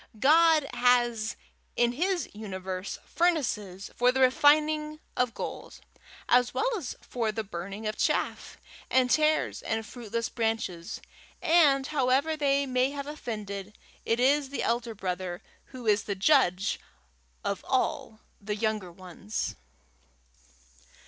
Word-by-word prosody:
God 310 +2 +5
has 240 -3 +2 0.4
in 240 0 +3
his 350 +7 -1
universe 190 -2 -5
furnaces 215 - -1
for 245 +1 +4
the 265 - -2
refining 300 +3 +3 0.2
of 250 -1 0
gold, - - -6 0.5
as 245 0 +3
well - - +1
as 320 - -5
for 230 -3 -2
the 220 +1 -3
burning 195 +2 -7
of 215 0 -2
chaff - - -1 0.3
and 255 -1 +3
tares 310 0 +2
and 225 0 -2
fruitless 230 0 -4
branches; 220 -7 -3 0.4
and, 315 -6 +4
however 280 +2 +1
they 280 -2 +2
may 255 0 +1
have 280 0 -5
offended, 210 -8 -6 0.3
it 230 +1 0
is 275 +2 +3
the 280 - -3
elder 235 0 -1
brother 180 -2 -4 0.2
who 255 -3 -10
is 210 -1 +2
the 200 - -2
judge 195 - +3 0.6
of 200 - -2
all 235 -4 -1 0.2
the 210 +1 -3
younger 215 -4 -2
ones. 185 +4 -5
240 Hz, 125 wpm, -28 LUFS, 210-280 Hz, 0.6 s, God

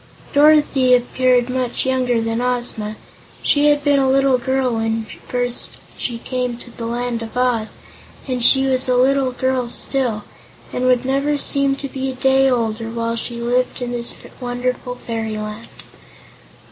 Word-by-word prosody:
Dorothy 285 -3 +5
appeared 250 0 +2
much 255 -1 -2
younger 255 -2 +1
than 225 +1 -1
Ozma. 240 -4 -2 0.5
She 290 0 +3
had 290 0 +2
been 285 -1 +3
a 265 -1 +2
little 270 -1 +3
girl 260 0 0
when 225 0 -1 0.2
first 245 -1 -2 0.2
she 240 -2 -3
came 250 0 -3
to 240 - -12
the 230 0 -6
Land 240 0 -2
of 230 +2 -7
Oz, 245 -3 0 0.5
and 250 -2 -2
she 265 +2 +5
was 260 -1 +2
a 250 - +3
little 265 +1 +3
girl 255 -1 -1
still, 240 -4 -1 0.5
and 250 - -1
would 250 0 +3
never 275 +2 +1
seem 275 -1 +1
to 275 - -5
be 265 0 -4
a 260 - -5
day 265 +1 +3
older 225 -2 -1
while 230 0 -2
she 235 +1 -4
lived 245 +2 0
in 245 -1 -4
this 240 -1 -1 0.2
wonderful 250 0 -3
fairyland. 220 -1 -5
250 Hz, 160 wpm, -19 LUFS, 235-265 Hz, 0.5 s, Dorothy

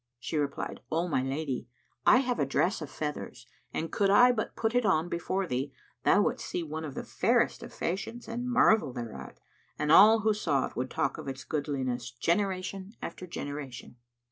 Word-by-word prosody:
She 120 - -5
replied, 145 -2 -2
"O 165 +3 +1
my 145 -6 +1
lady, 135 -2 -3 0.4
I 250 - +7
have 250 -2 -1
a 145 - +3
dress 175 +7 +1
of 150 - -5
feathers, 145 -5 -5 0.3
and 165 - -3
could 200 -1 +2
I 245 +5 +7
but 225 -2 -3
put 225 0 0
it 245 0 +3
on 175 -5 +2
before 185 +3 -1
thee, 135 -2 -3 0.3
thou - - +5
wouldst - - -2
see 175 - -2
one 160 0 -5
of 145 -4 -6
the - - -4
fairest - - +1
of - - -9
fashions 205 +7 -4
and 240 +2 -3
marvel 220 - +4
thereat, 120 -3 -7 0.4
and 150 - 0
all 215 +6 +8
who 215 0 +3
saw 155 -10 +1
it - - -9
would 130 +1 -2
talk - - -1
of - - -8
its 130 -1 -5
goodliness, 130 -5 -2
generation 190 - -1
after 185 - -6
generation." 140 -6 -6
160 Hz, 190 wpm, -29 LUFS, 135-205 Hz, 0.4 s, all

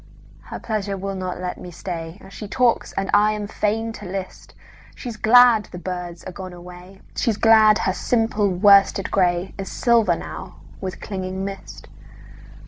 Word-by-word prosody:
Her - - -7
pleasure 205 -3 -3
will 195 +1 -4
not 185 -2 -4
let 180 0 -5
me 180 - -9
stay. 170 0 -7
She 210 +2 -8
talks 245 +2 +1
and 195 0 -2
I 210 +1 +4
am 210 -1 -4
fain 220 +2 -1
to 210 - -10
list:She's 195 +5 -9
glad 230 0 +6
the - - -10
birds 180 -1 -6
are - - -7
gone 185 0 -8
away, 180 +2 -12
She's 225 -4 0
glad 220 -2 +6
her 190 - 0
simple 225 -2 0
worsted 195 +1 +4
grayIs 185 +1 0
silver 230 -7 +3
now 185 +2 -8 0.3
with 185 -2 -6
clinging 190 -1 -4
mist. 195 -1 -8
195 Hz, 150 wpm, -22 LUFS, 180-215 Hz, 0.3 s, glad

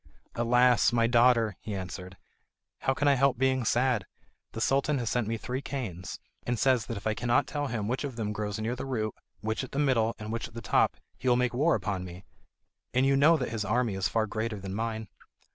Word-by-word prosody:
"Alas! 125 +1 +4
my 115 -1 +3
daughter," 115 -3 +4
he 105 - -5
answered, 95 0 -7 0.6
"how 135 - +1
can 145 - +1
I 140 - +6
help 135 -1 +3
being 130 0 +2
sad? 120 -1 +2 0.5
The 115 - -5
Sultan 140 +5 +2
has 120 -3 -2
sent 120 -3 0
me 115 +1 -1
three 125 +4 -4
canes, 105 -12 -5 0.2
and 120 0 -1
says 130 -2 +2
that 115 - -4
if 100 - -9
I 110 - +2
cannot 120 +2 +2
tell 145 -1 -3
him 115 -5 -2
which 125 +5 -1
of 140 -4 -4
them 105 -2 -2
grows 105 0 -3
near 115 +3 -1
the 130 - -5
root, 110 -5 -1 0.3
which 110 +3 -2
in 130 - -7
the - - -5
middle, 120 -6 +2
and 105 0 -6
which 115 - -3
at - - -18
the - - -4
top, 110 - +2 0.2
he 130 - 0
will 120 - +5
make 125 0 +1
war 150 +7 +3
upon 100 -4 -2
me. 90 +1 -9 0.7
And 130 +1 +4
you 135 0 +4
know 155 +4 +6
that 125 - -2
his 115 -2 -2
army 115 +2 +1
is 95 -1 0
far 110 -1 +1
greater 110 0 -3
than 95 0 -6
mine." 110 0 -3
115 Hz, 230 wpm, -29 LUFS, 110-130 Hz, 0.7 s, I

